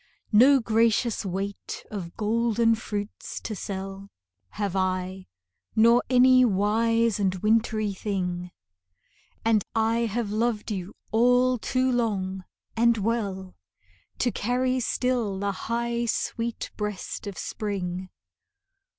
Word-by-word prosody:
No 260 +6 +7
gracious 230 0 +2
weight 195 +1 -5
of 185 -5 -6
golden 230 +1 +2
fruits 210 -2 -5
to 215 - -4
sell 195 0 -6 0.4
Have 200 -3 -3
I, 185 0 -1 0.5
nor 235 +2 +6
any 255 0 +6
wise 225 +1 +2
and 190 -2 +1
wintry 215 +1 +1
thing; 180 -3 -3 1.0
And 220 -3 +3
I 225 +1 +2
have 220 -1 -2
loved 220 0 -1
you 190 -1 -5 0.2
all 245 +2 +4
too 255 +3 +1
long 190 -6 -1 0.3
and 235 0 +4
well 200 -4 -2 0.6
To 245 - +1
carry 255 +4 0
still 240 -4 0
the 200 +1 -1
high 235 +4 -2
sweet 230 0 -2
breast 210 0 -4
of 200 - -6
spring. 185 -3 -4
215 Hz, 110 wpm, -26 LUFS, 195-235 Hz, 1.0 s, No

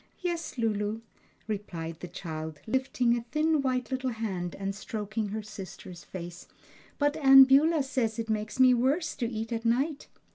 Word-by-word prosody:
"Yes, 340 -5 -3
Lulu," 215 -1 -1 0.5
replied 170 -6 -5
the 180 - -6
child, 160 -3 -6
lifting 250 0 +1
a 240 - -2
thin 310 0 +2
white 255 -1 -1
little 260 0 -1
hand 195 -7 -3
and 195 0 -3
stroking 215 0 -4
her 215 +2 -4
sister's 190 -4 -9
face, 175 -1 -8 0.5
"but 290 0 +2
Aunt 270 -2 +9
Beulah 295 +3 +4
says 245 -5 -1
it 225 -1 -3
makes 215 +2 -3
me 255 -1 +7
worse 270 +8 +1
to 235 -4 -1
eat 225 0 -4
at 225 0 -3
night." 270 +6 0
225 Hz, 160 wpm, -29 LUFS, 205-265 Hz, 0.5 s, Aunt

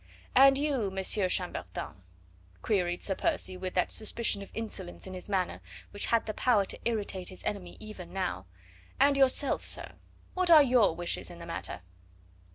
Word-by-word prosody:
"And 270 +1 +7
you, 275 -8 0
Monsieur 190 0 0
Chambertin?" 135 - -3 0.7
queried 180 -4 0
Sir 195 - 0
Percy 185 0 -1
with 185 0 -5
that 180 - +1
suspicion 215 -1 +1
of 200 - -9
insolence 210 -5 -5
in 190 - -8
his 185 +2 -7
manner 185 -3 -1 0.3
which 205 - -1
had 230 -1 +2
the 215 - -3
power 215 -3 +3
to - - -4
irritate 205 -5 -2
his 185 - -10
enemy 185 -4 -4
even 215 -5 -9
now. 95 - -3 0.5
"And 280 +1 +5
yourself, 275 +1 +2
sir; - - -1 0.4
what 365 -1 0
are 315 -3 +9
your 245 -10 +4
wishes 175 0 -3
in 175 - -10
the 170 - -9
matter?" 165 - -5
200 Hz, 165 wpm, -30 LUFS, 180-235 Hz, 0.7 s, are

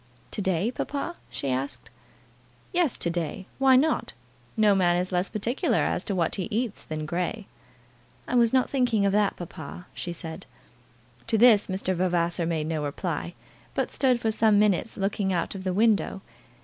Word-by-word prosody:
"To - - -3
day, 190 +3 0
papa?" 290 +6 -4
she 135 - -3
asked. 130 -2 -1 0.8
"Yes, 345 -7 +2
to 170 - -1
day. 170 +2 -3
Why 265 -1 +6
not? 300 +5 +2 0.4
No 215 -2 +5
man 175 -2 +3
is 180 +1 -1
less 180 +1 0
particular 230 +4 0
as - - 0
to 200 - -2
what 170 -3 0
he 185 - -2
eats 225 -1 -2
than 155 -1 -5
Grey." 180 +6 -2 0.8
"I - - -4
was 235 -2 +4
not 260 -1 +3
thinking 245 -6 +1
of 200 - +3
that, 205 0 +2
papa," 175 0 -8
she 175 - -5
said. 165 -1 -8 0.8
To 230 -1 +2
this 220 -2 +6
Mr. 190 0 -1
Vavasor 175 -2 0
made 160 -2 -1
no 155 -1 -2
reply, 165 +3 -3 0.4
but - - -1
stood 255 -3 +2
for 225 -2 0
some 215 -1 +4
minutes 210 +1 +2
looking 195 -1 0
out 175 -2 -1
of 190 -1 -7
the 185 - -1
window. 205 -1 +2
195 Hz, 175 wpm, -26 LUFS, 175-225 Hz, 0.8 s, Why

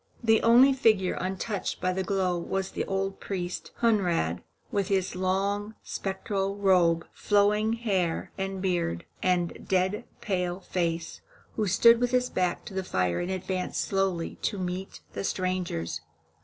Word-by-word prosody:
The 225 -1 +4
only 245 +4 +7
figure 215 -8 +3
untouched 190 +3 -3
by 185 0 0
the 190 - -1
glow 185 -1 0
was 190 +2 -2
the - - -2
old 195 0 -2
priest, 180 -2 -4
Hunrad, 175 - +2 0.3
with 200 -2 0
his 190 -2 0
long, 200 +3 -1
spectral 195 0 -2
robe, 180 -4 +3
flowing 210 +2 +2
hair 195 -8 -1
and 195 -1 -3
beard, 170 - 0 0.2
and 180 -2 0
dead 190 +4 +1
pale 180 -3 -1
face, 170 -3 -2 0.3
who 215 -2 0
stood 230 +5 +6
with 245 - +2
his 250 0 +1
back 180 -1 0
to - - -8
the 190 0 -2
fire 90 - 0
and 175 - -2
advanced 185 0 -2
slowly 190 -4 -1
to 205 - -1
meet 185 +1 -4
the - - -4
strangers. 180 - -2
190 Hz, 145 wpm, -28 LUFS, 180-205 Hz, 0.3 s, only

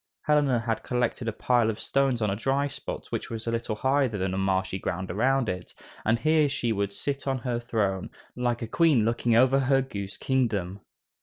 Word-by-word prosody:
Helena 145 -5 +3
had 115 -1 -2
collected 125 -1 -1
a - - +1
pile 120 +1 +2
of 110 - -3
stones 135 -4 +1
on 105 - +1
a - - -1
dry 135 +6 0
spot - - -6
which - - -3
was 115 -1 -5
a 115 - -1
little 115 -2 -2
higher 135 +4 +2
than 95 -5 -2
the 95 - -2
marshy 95 0 0
ground 90 +1 -3
around 130 +5 +2
it, 90 -2 -5 0.3
and 115 +2 +2
here 155 +2 +3
she 120 -4 -1
would 100 -2 -1
sit 140 +7 -4
on 135 -1 +1
her 120 -1 -2
throne, 105 -6 -1 0.3
like 120 -1 -1
a - - -3
queen 145 -3 +3
looking 115 0 +1
over 130 +3 +5
her 135 0 +3
goose 100 -6 -5
kingdom. 105 -8 0
120 Hz, 205 wpm, -27 LUFS, 105-135 Hz, 0.3 s, over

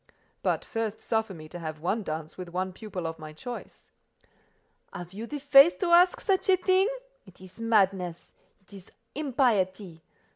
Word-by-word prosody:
"But - - 0
first 220 -1 -3
suffer 220 -2 -1
me 155 -1 -10
to 175 - -8
have 155 -2 -6
one 185 +8 -1
dance 155 -4 -5
with 180 -2 -8
one 185 +1 -3
pupil 190 -4 -6
of 160 0 -4
my 155 0 -9
choice." 240 +10 -9 1.0
"Have 175 +1 -8
you 220 +4 -6
the 295 - -5
face 280 +3 +7
to 360 -3 -1
ask 355 +1 +5
such 390 -2 0
a 375 - +6
thing? 375 +2 +3 0.4
It 185 - -17
is 185 +4 -13
madness: 195 -6 +1 0.3
it 190 - -22
is 195 -2 -13 0.2
impiety. 210 - 0
195 Hz, 170 wpm, -28 LUFS, 175-255 Hz, 1.0 s, face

